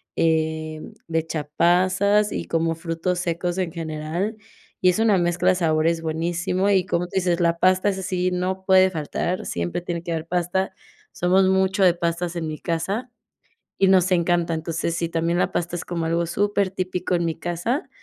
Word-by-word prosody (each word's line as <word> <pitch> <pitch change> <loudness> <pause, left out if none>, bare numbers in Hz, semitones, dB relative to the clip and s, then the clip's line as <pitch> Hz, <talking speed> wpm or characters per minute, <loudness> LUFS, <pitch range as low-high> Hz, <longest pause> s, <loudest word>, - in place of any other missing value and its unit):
em, 160 -1 -1 0.2
le 165 0 +1
echa 160 -1 -3
pasas 185 +4 +3
y - - -3
como 165 0 0
frutos 165 +2 -2
secos 175 0 -2
en 180 -4 -2
general, 165 +6 -3 0.5
y 185 - +6
es 180 - +1
una 220 -4 +3
mezcla 175 +1 +1
de - - +5
sabores 165 -1 +1
buenísimo 175 +4 -1
y, 190 -2 +2
como 175 0 0
tú - - -13
dices, 180 -2 +1
la 170 -1 +1
pasta, 185 +3 +3
esa 190 -1 -3
sí, 185 -1 -1
no 185 +1 -2
puede 190 0 +6
faltar, 175 +2 -3
siempre 85 - -3
tiene 170 -1 -4
que 170 - -5
haber 160 -1 -2
pasta. 180 +2 -1 0.4
Somos 185 +2 +3
mucho 190 +1 +2
de 180 -2 +6
pastas 170 0 -2
en 165 -2 -3
mi 155 0 -4
casa 195 +11 -3 0.7
y 195 - +4
nos 185 0 +4
encanta. 175 -1 +2
Entonces, 165 +1 -2
sí, 170 - -1
también 165 +1 0
la - - +1
pasta 175 0 -2
es 170 - -6
como 170 -2 -3
algo 170 +1 0
supertípico 185 -1 -1
en 170 -1 +1
mi 165 -1 -1
casa, 175 - -2
175 Hz, 185 wpm, -23 LUFS, 165-185 Hz, 0.7 s, y